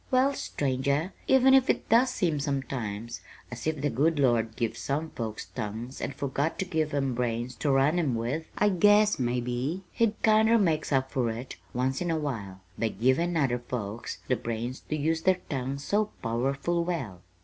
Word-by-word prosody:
"Well, 265 Hz, +2 st, +3 dB
stranger, 140 Hz, -, -1 dB
even 265 Hz, 0 st, +6 dB
if 265 Hz, -1 st, +5 dB
it -, -, +1 dB
does 240 Hz, +3 st, +5 dB
seem 170 Hz, -11 st, 0 dB
sometimes 120 Hz, -6 st, -3 dB, 0.3 s
as 120 Hz, +4 st, -5 dB
if 155 Hz, -3 st, -1 dB
the 145 Hz, -1 st, 0 dB
good 150 Hz, +7 st, +2 dB
Lord 115 Hz, -5 st, +2 dB
give 115 Hz, 0 st, -1 dB
some 155 Hz, +3 st, -3 dB
folks 110 Hz, -4 st, -5 dB
tongues 110 Hz, +7 st, -6 dB
and -, -, -3 dB
forgot 140 Hz, +3 st, -1 dB
to 190 Hz, -, -1 dB
give 160 Hz, -4 st, -1 dB
'em 135 Hz, -2 st, 0 dB
brains 120 Hz, 0 st, -2 dB
to 145 Hz, -, 0 dB
run 140 Hz, +6 st, +3 dB
'em 140 Hz, -8 st, +1 dB
with, 125 Hz, +8 st, -2 dB
I 210 Hz, -, +4 dB
guess 205 Hz, +1 st, +4 dB
maybe 125 Hz, +7 st, -1 dB
He 225 Hz, -2 st, +1 dB
kinder 220 Hz, +1 st, +5 dB
makes 165 Hz, -8 st, +1 dB
up 130 Hz, -1 st, +1 dB
for 125 Hz, -3 st, 0 dB
it, 115 Hz, +3 st, -6 dB
once 130 Hz, +3 st, -1 dB
in 175 Hz, -, -1 dB
a 165 Hz, -, +1 dB
while, 105 Hz, -11 st, -4 dB, 0.2 s
by 115 Hz, -, +2 dB
givin' 130 Hz, -, +1 dB
other 130 Hz, -5 st, +1 dB
folks 120 Hz, -2 st, -5 dB
the 125 Hz, -, +2 dB
brains 115 Hz, +2 st, -4 dB
to 155 Hz, -, 0 dB
use 160 Hz, +2 st, 0 dB
their 185 Hz, +1 st, +2 dB
tongues 135 Hz, +1 st, -3 dB
so 210 Hz, +7 st, +2 dB, 0.2 s
powerful 135 Hz, +9 st, 0 dB
well!" 130 Hz, -, -4 dB
140 Hz, 180 wpm, -28 LUFS, 120-170 Hz, 0.3 s, even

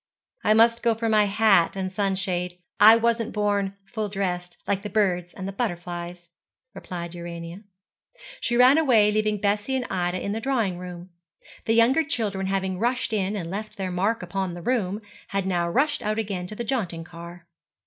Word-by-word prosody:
'I 215 Hz, -, +4 dB
must 230 Hz, +1 st, +5 dB
go 230 Hz, -1 st, +2 dB
for 225 Hz, +1 st, -2 dB
my 215 Hz, -1 st, +4 dB
hat 200 Hz, -4 st, +3 dB
and 190 Hz, -1 st, -3 dB
sunshade. 185 Hz, -2 st, -1 dB, 0.2 s
I 215 Hz, +2 st, +9 dB
wasn't 230 Hz, 0 st, 0 dB
born 205 Hz, -2 st, 0 dB
full 215 Hz, +1 st, -4 dB
dressed, 180 Hz, -3 st, -3 dB
like 200 Hz, -1 st, 0 dB
the 210 Hz, -, -5 dB
birds 180 Hz, -4 st, +1 dB
and 195 Hz, 0 st, -6 dB
butterflies,' 175 Hz, -4 st, -4 dB, 0.4 s
replied 175 Hz, -3 st, -6 dB
Urania. 170 Hz, +1 st, -7 dB, 0.8 s
She 240 Hz, -, 0 dB
ran 255 Hz, +5 st, +7 dB
away, 225 Hz, -9 st, +4 dB
leaving 215 Hz, 0 st, +1 dB
Bessie 205 Hz, +5 st, 0 dB
and 255 Hz, -1 st, -1 dB
Ida 180 Hz, -1 st, -1 dB
in 200 Hz, -, -3 dB
the 220 Hz, -, -2 dB
drawing 225 Hz, -9 st, 0 dB
room. 180 Hz, 0 st, -9 dB, 0.5 s
The 225 Hz, -, +2 dB
younger 245 Hz, +7 st, +4 dB
children 205 Hz, -9 st, -2 dB
having 190 Hz, -1 st, -1 dB
rushed 245 Hz, +1 st, 0 dB
in 200 Hz, -1 st, 0 dB
and 175 Hz, -4 st, -4 dB
left 210 Hz, +2 st, -6 dB
their 190 Hz, -2 st, -3 dB
mark 195 Hz, +4 st, 0 dB
upon 185 Hz, 0 st, -3 dB
the 175 Hz, -, -8 dB
room, 215 Hz, -3 st, -1 dB, 0.2 s
had 195 Hz, -1 st, -2 dB
now 175 Hz, -2 st, 0 dB
rushed 290 Hz, -, +1 dB
out 215 Hz, +1 st, -1 dB
again 195 Hz, -5 st, -3 dB
to 215 Hz, -, -6 dB
the 235 Hz, -, -4 dB
jaunting 200 Hz, -9 st, -2 dB
car. 170 Hz, +1 st, -11 dB
200 Hz, 180 wpm, -25 LUFS, 180-220 Hz, 0.8 s, I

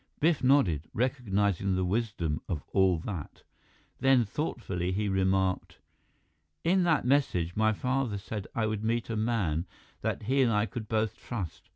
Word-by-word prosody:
Biff 155 Hz, -2 st, +2 dB
nodded, 105 Hz, -, +3 dB
recognizing 100 Hz, -6 st, +1 dB
the 95 Hz, 0 st, 0 dB
wisdom 90 Hz, -6 st, -1 dB
of 75 Hz, -6 st, -2 dB
all 95 Hz, -3 st, +4 dB
that. 90 Hz, -8 st, -6 dB, 0.6 s
Then, 130 Hz, -2 st, +4 dB
thoughtfully, 100 Hz, -, -3 dB
he 105 Hz, +3 st, 0 dB
remarked: 95 Hz, -1 st, +1 dB, 0.9 s
"In 185 Hz, +3 st, +3 dB
that 160 Hz, -7 st, +2 dB
message, 110 Hz, -, +1 dB
my 110 Hz, 0 st, +3 dB
father 125 Hz, -1 st, -1 dB
said 100 Hz, 0 st, -6 dB
I 115 Hz, -, +1 dB
would 110 Hz, -1 st, -2 dB
meet 115 Hz, +1 st, -1 dB
a -, -, -1 dB
man 105 Hz, -7 st, 0 dB, 0.3 s
that -, -, -2 dB
he 135 Hz, +6 st, +2 dB
and 125 Hz, -3 st, +4 dB
I 105 Hz, 0 st, +2 dB
could 115 Hz, -2 st, -6 dB
both 110 Hz, -1 st, 0 dB
trust. 100 Hz, -9 st, -6 dB
105 Hz, 155 wpm, -29 LUFS, 95-125 Hz, 0.9 s, all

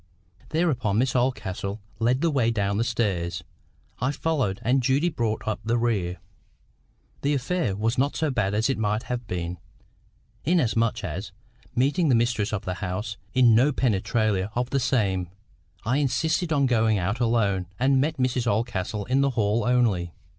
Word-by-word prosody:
Thereupon, 130 Hz, -, +1 dB
Miss 130 Hz, +3 st, +1 dB
Oldcastle 110 Hz, -5 st, -1 dB, 0.2 s
led 125 Hz, +4 st, +2 dB
the 165 Hz, -1 st, +2 dB
way 130 Hz, -5 st, +2 dB
down 100 Hz, -3 st, 0 dB
the -, -, +2 dB
stairs, 95 Hz, -8 st, -1 dB, 0.6 s
I 125 Hz, +4 st, +1 dB
followed, 140 Hz, -11 st, -1 dB
and 130 Hz, +3 st, +2 dB
Judy 135 Hz, +7 st, +2 dB
brought 115 Hz, -9 st, -2 dB
up 110 Hz, -, -1 dB
the 115 Hz, +3 st, +1 dB
rear. 100 Hz, -7 st, 0 dB, 1.0 s
The 145 Hz, +1 st, +1 dB
affair 140 Hz, -, -1 dB
was 115 Hz, +4 st, 0 dB
not 140 Hz, +2 st, +1 dB
so 155 Hz, -2 st, 0 dB
bad 105 Hz, -5 st, 0 dB
as 110 Hz, +2 st, +2 dB
it 135 Hz, -4 st, -1 dB
might 105 Hz, +1 st, 0 dB
have 125 Hz, -2 st, -4 dB
been, 90 Hz, -1 st, -4 dB, 0.8 s
inasmuch 115 Hz, -9 st, +1 dB
as, 95 Hz, +3 st, -5 dB, 0.4 s
meeting 145 Hz, +6 st, +2 dB
the 125 Hz, -, +5 dB
mistress 115 Hz, -3 st, +1 dB
of 105 Hz, -3 st, -3 dB
the 90 Hz, -, -2 dB
house 105 Hz, +3 st, -3 dB, 0.2 s
in 125 Hz, -3 st, +6 dB
no 125 Hz, +7 st, +4 dB
penetralia 110 Hz, -5 st, 0 dB
of 125 Hz, +1 st, -1 dB
the 140 Hz, -, +2 dB
same, 100 Hz, -9 st, 0 dB, 0.6 s
I 125 Hz, +4 st, +1 dB
insisted 160 Hz, +4 st, 0 dB
on 140 Hz, -2 st, +3 dB
going 110 Hz, -4 st, +2 dB
out 95 Hz, +6 st, -1 dB
alone, 105 Hz, -6 st, +1 dB
and 130 Hz, +1 st, +3 dB
met 155 Hz, +2 st, -1 dB
Mrs 125 Hz, -1 st, 0 dB
Oldcastle 105 Hz, -2 st, -1 dB
in 130 Hz, +2 st, +2 dB
the 140 Hz, -, +3 dB
hall 105 Hz, +1 st, +2 dB
only. 110 Hz, -9 st, +1 dB
115 Hz, 165 wpm, -25 LUFS, 100-130 Hz, 1.0 s, in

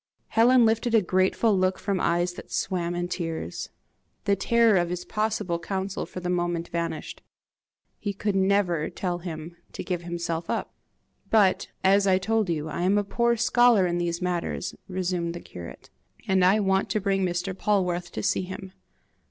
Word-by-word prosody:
Helen 235 Hz, +2 st, +5 dB
lifted 225 Hz, +1 st, +2 dB
a 225 Hz, -, +6 dB
grateful 185 Hz, +4 st, +2 dB
look 185 Hz, 0 st, +1 dB
from 200 Hz, -2 st, -1 dB
eyes 175 Hz, +1 st, +1 dB
that -, -, -11 dB
swam 175 Hz, -2 st, -1 dB
in 175 Hz, 0 st, -2 dB
tears. 165 Hz, -, -4 dB, 0.6 s
The 200 Hz, -1 st, +3 dB
terror 230 Hz, 0 st, +3 dB
of 175 Hz, -1 st, +1 dB
his 180 Hz, 0 st, -4 dB
possible 210 Hz, -5 st, -1 dB
counsel 190 Hz, +2 st, -3 dB
for -, -, -7 dB
the 180 Hz, -, -5 dB
moment 175 Hz, -1 st, -1 dB
vanished. 170 Hz, -1 st, -4 dB, 0.8 s
He 205 Hz, -, -2 dB
could 200 Hz, 0 st, -2 dB
never 190 Hz, -4 st, +2 dB
tell 175 Hz, -2 st, -3 dB
him 170 Hz, -1 st, -7 dB, 0.2 s
to -, -, -5 dB
give 180 Hz, -2 st, -2 dB
himself 170 Hz, -1 st, -4 dB
up! -, -, -2 dB, 0.6 s
"But, 205 Hz, -4 st, +3 dB, 0.2 s
as 195 Hz, +1 st, +4 dB
I 185 Hz, -1 st, +5 dB
told 220 Hz, +1 st, 0 dB
you, 155 Hz, -2 st, -1 dB
I 155 Hz, -, -4 dB
am 190 Hz, +3 st, +3 dB
a 205 Hz, -, +2 dB
poor 235 Hz, +3 st, +1 dB
scholar 235 Hz, -3 st, +4 dB
in 175 Hz, 0 st, 0 dB
these 170 Hz, -1 st, -1 dB
high 180 Hz, -, -7 dB
matters," 180 Hz, 0 st, -2 dB
resumed 180 Hz, -2 st, -2 dB
the -, -, -5 dB
curate, 85 Hz, -, -11 dB, 0.4 s
"and 190 Hz, -1 st, +3 dB
I 190 Hz, +4 st, +5 dB
want 190 Hz, -1 st, +1 dB
to 215 Hz, -, +1 dB
bring 195 Hz, -1 st, 0 dB
Mr. 180 Hz, +1 st, -2 dB
Polwarth 180 Hz, -4 st, 0 dB
to -, -, -4 dB
see -, -, +1 dB
him." 190 Hz, +1 st, -7 dB
185 Hz, 175 wpm, -26 LUFS, 175-200 Hz, 0.8 s, a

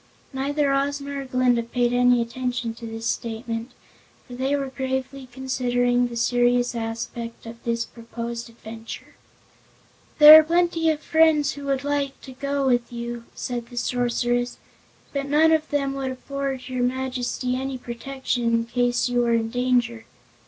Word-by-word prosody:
Neither 280 Hz, +1 st, 0 dB
Ozma 280 Hz, +1 st, -1 dB
nor 275 Hz, -1 st, -4 dB
Glinda 255 Hz, -2 st, +2 dB
paid 240 Hz, +1 st, 0 dB
any 245 Hz, -1 st, +4 dB
attention 245 Hz, -1 st, -3 dB
to 230 Hz, 0 st, -9 dB
this 225 Hz, 0 st, -6 dB
statement, 230 Hz, +1 st, -3 dB, 0.6 s
for 250 Hz, -, -12 dB
they 265 Hz, +3 st, 0 dB
were 275 Hz, -1 st, -2 dB
gravely 265 Hz, 0 st, -4 dB
considering 245 Hz, -1 st, +1 dB
the 240 Hz, -, -8 dB
serious 245 Hz, +1 st, +2 dB
aspect 230 Hz, 0 st, -5 dB
of 230 Hz, 0 st, -10 dB
this 230 Hz, 0 st, -1 dB
proposed 235 Hz, 0 st, -7 dB
adventure. 225 Hz, 0 st, -10 dB, 1.0 s
"There 305 Hz, 0 st, +12 dB
are -, -, +4 dB
plenty 335 Hz, 0 st, +2 dB
of 310 Hz, -1 st, 0 dB
friends 315 Hz, -3 st, +3 dB
who 285 Hz, -1 st, -8 dB
would 275 Hz, -1 st, -1 dB
like 285 Hz, -1 st, -1 dB
to 265 Hz, -, -10 dB
go 280 Hz, +1 st, -2 dB
with 245 Hz, -2 st, +1 dB
you," 235 Hz, 0 st, -5 dB
said 240 Hz, -2 st, -4 dB
the 245 Hz, -, -12 dB
Sorceress, 245 Hz, 0 st, 0 dB, 0.6 s
"but 280 Hz, -1 st, -2 dB
none 310 Hz, +3 st, +4 dB
of 315 Hz, -1 st, +2 dB
them 275 Hz, -2 st, 0 dB
would 270 Hz, -1 st, -3 dB
afford 270 Hz, 0 st, -4 dB
your 255 Hz, -1 st, -3 dB
Majesty 250 Hz, 0 st, -1 dB
any 265 Hz, 0 st, -3 dB
protection 250 Hz, 0 st, -4 dB
in 230 Hz, 0 st, +2 dB
case 245 Hz, +1 st, +1 dB
you 245 Hz, 0 st, 0 dB
were 235 Hz, -1 st, +2 dB
in 225 Hz, -1 st, -1 dB
danger. 245 Hz, -2 st, 0 dB
250 Hz, 155 wpm, -24 LUFS, 235-275 Hz, 1.0 s, There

